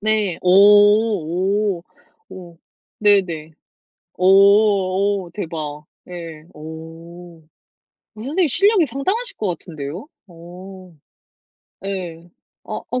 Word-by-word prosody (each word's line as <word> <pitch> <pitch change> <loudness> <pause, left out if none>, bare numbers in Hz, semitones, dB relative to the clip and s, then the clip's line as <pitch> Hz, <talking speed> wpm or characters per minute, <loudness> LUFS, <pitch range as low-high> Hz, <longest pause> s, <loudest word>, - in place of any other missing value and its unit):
네 210 -4 0
오 200 -1 +3
오. - - -26 0.5
오 175 -3 -12 0.4
네네. 180 -7 +1 0.7
어 - - -7
어 200 -1 +3
대박. 155 -5 -6 0.2
예 165 -3 -9
어 150 - -14
어 165 +2 -11 0.7
선생님 290 - -1
실력이 395 - +3
상당하실 385 - -3
것 210 - -2
같은데요? 165 - -6 0.2
어 180 +2 -13 0.9
예 175 -4 -6 0.4
아 - - -6
어 250 - -1
185 Hz, 150 characters per minute, -20 LUFS, 170-210 Hz, 0.9 s, 오